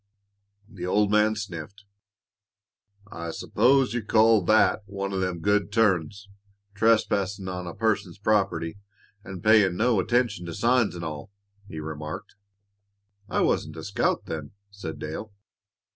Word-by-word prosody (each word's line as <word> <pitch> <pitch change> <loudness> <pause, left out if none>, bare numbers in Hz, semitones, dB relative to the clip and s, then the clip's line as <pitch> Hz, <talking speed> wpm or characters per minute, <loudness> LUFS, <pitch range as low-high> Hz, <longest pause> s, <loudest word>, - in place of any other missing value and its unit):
The 95 -5 -7
old 105 +2 +2
man 105 +1 +3
sniffed. 100 -1 -7 1.3
"I 85 0 -6
s'pose 130 +9 +2
you 120 - -1
call 110 0 +4
that 110 +1 +4
one 100 0 -4
o' 95 - -1
them 90 -2 -2
'good 105 +2 +1
turns' 100 -3 +1 0.5
trespassin' 100 -3 +1
on 90 -1 -5
a 85 - -7
person's 105 -5 -1
property, 95 -5 0 0.4
an' 95 -2 -8
payin' 105 -4 +4
no 115 -1 +2
attention 105 -3 0
to 85 - -6
signs, 120 -4 +2
an' 85 - -6
all," 75 +1 -6 0.4
he 80 - -7
remarked. 75 0 -7 1.0
"I - - 0
wasn't - - 0
a - - -7
scout - - 0
then," 75 0 -6 0.2
said 90 -6 -7
Dale. 80 +8 -6
100 Hz, 135 wpm, -26 LUFS, 85-110 Hz, 1.3 s, call